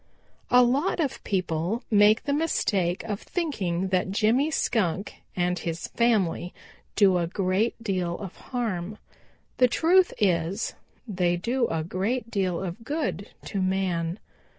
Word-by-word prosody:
"A 250 Hz, 0 st, +7 dB
lot 275 Hz, +10 st, +1 dB
of 290 Hz, -6 st, -2 dB
people 180 Hz, +3 st, -1 dB
make 210 Hz, +1 st, +5 dB
the 285 Hz, -, -1 dB
mistake 200 Hz, -, 0 dB
of 210 Hz, -3 st, -4 dB
thinking 190 Hz, -, -2 dB
that 185 Hz, -1 st, +1 dB
Jimmy 225 Hz, +9 st, +2 dB
Skunk 200 Hz, -, -1 dB
and 180 Hz, 0 st, 0 dB
his 165 Hz, 0 st, -4 dB
family 205 Hz, -7 st, +1 dB, 0.4 s
do 190 Hz, -3 st, +5 dB
a 170 Hz, -, 0 dB
great 190 Hz, +5 st, 0 dB
deal 185 Hz, -5 st, -1 dB
of 195 Hz, -3 st, -8 dB
harm. 215 Hz, -5 st, -4 dB, 0.6 s
The 250 Hz, -, +6 dB
truth 355 Hz, +8 st, +4 dB
is, 185 Hz, 0 st, 0 dB, 0.3 s
they 180 Hz, -4 st, +1 dB
do 235 Hz, +6 st, 0 dB
a 160 Hz, -1 st, -2 dB
great 215 Hz, +8 st, -2 dB
deal 185 Hz, -3 st, -1 dB
of 185 Hz, +5 st, -6 dB
good 225 Hz, -, -3 dB, 0.2 s
to 195 Hz, -, -2 dB
man. 185 Hz, -2 st, 0 dB
195 Hz, 135 wpm, -26 LUFS, 180-235 Hz, 0.6 s, A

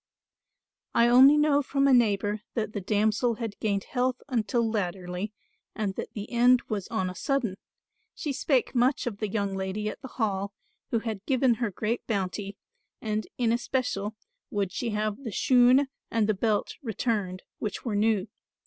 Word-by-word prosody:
"I 235 Hz, -, +5 dB
only 265 Hz, +5 st, +8 dB
know 295 Hz, -1 st, +4 dB
from 275 Hz, 0 st, +1 dB
a 275 Hz, -, +5 dB
neighbour 210 Hz, -3 st, +2 dB
that 220 Hz, -2 st, -2 dB
the 205 Hz, -, -3 dB
damsel 215 Hz, +4 st, +1 dB
had 225 Hz, -3 st, -5 dB
gained 200 Hz, -2 st, 0 dB
health 255 Hz, 0 st, -1 dB
until 235 Hz, -2 st, +1 dB
latterly 185 Hz, -2 st, -3 dB, 0.4 s
and 210 Hz, -3 st, -1 dB
that -, -, -6 dB
the 210 Hz, 0 st, -6 dB
end 245 Hz, +1 st, +5 dB
was 205 Hz, -4 st, -3 dB
on 220 Hz, -5 st, -1 dB
a 180 Hz, -, -4 dB
sudden. 255 Hz, -3 st, -1 dB, 0.6 s
She 290 Hz, -, -3 dB
spake 265 Hz, -2 st, +1 dB
much 260 Hz, +4 st, +2 dB
of 215 Hz, -4 st, -4 dB
the 215 Hz, -, -1 dB
young 200 Hz, -1 st, -1 dB
lady 190 Hz, +2 st, -2 dB
at -, -, -8 dB
the 265 Hz, -, -7 dB
Hall, 200 Hz, -5 st, -2 dB, 0.4 s
who 230 Hz, -, 0 dB
had 220 Hz, -4 st, -4 dB
given 260 Hz, -2 st, +3 dB
her 235 Hz, -, +1 dB
great 215 Hz, +4 st, -3 dB
bounty; 200 Hz, -1 st, -2 dB, 0.4 s
and 215 Hz, -1 st, -2 dB
in 235 Hz, -2 st, +2 dB
especial 235 Hz, -4 st, -1 dB, 0.3 s
would 200 Hz, -3 st, -1 dB
she 240 Hz, -, -2 dB
have 210 Hz, -1 st, -1 dB
the 235 Hz, -, -4 dB
shoon 255 Hz, +6 st, +5 dB, 0.2 s
and 225 Hz, -2 st, +1 dB
the 215 Hz, -, +3 dB
belt 210 Hz, +1 st, 0 dB
returned, 210 Hz, -6 st, -2 dB, 0.2 s
which 210 Hz, +2 st, -4 dB
were 225 Hz, -4 st, -1 dB
new. 210 Hz, -1 st, +2 dB
220 Hz, 170 wpm, -27 LUFS, 205-245 Hz, 0.6 s, only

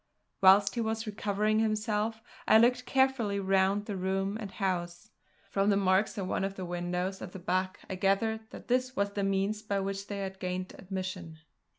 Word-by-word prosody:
Whilst 195 Hz, +1 st, +6 dB
he 235 Hz, -, -1 dB
was 220 Hz, 0 st, -2 dB
recovering 210 Hz, 0 st, 0 dB
himself 220 Hz, 0 st, 0 dB, 0.2 s
I 220 Hz, -, +7 dB
looked 250 Hz, +2 st, +3 dB
carefully 265 Hz, -7 st, +2 dB
round 195 Hz, +1 st, +2 dB
the 205 Hz, -, -4 dB
room 190 Hz, +2 st, -1 dB
and 205 Hz, -, -5 dB
house. 180 Hz, 0 st, -3 dB, 0.4 s
From 195 Hz, +1 st, +2 dB
the 200 Hz, -, +4 dB
marks 195 Hz, +2 st, +2 dB
at 195 Hz, -, -2 dB
one 185 Hz, -, -1 dB
of 195 Hz, 0 st, -2 dB
the 185 Hz, -, -5 dB
windows 180 Hz, +2 st, -3 dB
at 180 Hz, -, -7 dB
the -, -, -6 dB
back 185 Hz, +1 st, -1 dB
I -, -, -4 dB
gathered 220 Hz, +4 st, 0 dB
that -, -, -11 dB
this 255 Hz, +1 st, +1 dB
was 200 Hz, 0 st, 0 dB
the 200 Hz, 0 st, -2 dB
means 195 Hz, +2 st, 0 dB
by 205 Hz, -2 st, -1 dB
which 195 Hz, +1 st, -3 dB
they 205 Hz, -, -4 dB
had 190 Hz, 0 st, -5 dB
gained 185 Hz, 0 st, -3 dB
admission. 185 Hz, -3 st, -5 dB
195 Hz, 190 wpm, -30 LUFS, 190-215 Hz, 0.4 s, I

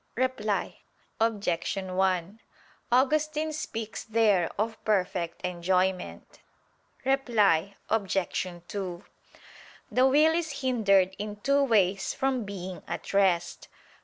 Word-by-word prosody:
Reply 230 Hz, -5 st, -1 dB, 0.4 s
Obj. 205 Hz, -7 st, 0 dB
1: 190 Hz, +1 st, -1 dB, 0.5 s
Augustine 305 Hz, +4 st, +2 dB
speaks 225 Hz, -7 st, -5 dB
there 215 Hz, -6 st, +2 dB
of 220 Hz, +2 st, -2 dB
perfect 180 Hz, -4 st, -1 dB
enjoyment. 180 Hz, +1 st, -1 dB, 0.7 s
Reply 210 Hz, -9 st, +2 dB
Obj. 200 Hz, -3 st, 0 dB, 0.5 s
2: 185 Hz, -3 st, -5 dB, 0.9 s
The 255 Hz, +1 st, +4 dB
will 305 Hz, +4 st, +5 dB
is 320 Hz, -5 st, -2 dB
hindered 200 Hz, -7 st, +3 dB
in 210 Hz, 0 st, -4 dB
two 280 Hz, +3 st, +3 dB
ways 200 Hz, -6 st, +2 dB
from 265 Hz, -4 st, 0 dB
being 190 Hz, -2 st, -6 dB
at -, -, -5 dB
rest. 190 Hz, -3 st, +1 dB
205 Hz, 100 wpm, -28 LUFS, 185-255 Hz, 0.9 s, will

